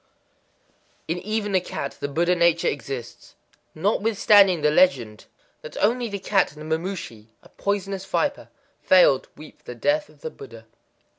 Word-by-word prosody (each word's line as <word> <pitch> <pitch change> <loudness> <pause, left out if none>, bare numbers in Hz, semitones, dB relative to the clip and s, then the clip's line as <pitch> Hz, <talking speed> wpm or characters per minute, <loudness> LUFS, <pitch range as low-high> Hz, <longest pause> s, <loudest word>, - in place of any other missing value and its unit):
_ - - -43 1.0
In 170 +2 -2
even 210 +1 -3
a 185 - +3
cat 140 -5 -6
the 145 - -3
Buddha 170 +5 +1
nature 170 -1 +2
exists. 130 -3 -6 0.4
Notwithstanding 200 -1 +3
the 150 0 +3
legend 130 -12 +1 0.3
that 155 - -10
only 235 +3 +1
the 200 - -4
cat 195 -3 +1
and 155 +1 -9
the - - +4
mamushi 165 - -7 0.2
(a - - -18
poisonous 200 -1 -3
viper) 285 +8 -2 0.3
failed 180 -8 +4
to - - -31
weep 155 - -13
for - - -35
the 125 - -8
death 295 - 0
of - - -22
the 475 -1 -6
Buddha. 420 -2 -13
180 Hz, 165 wpm, -23 LUFS, 150-205 Hz, 1.0 s, the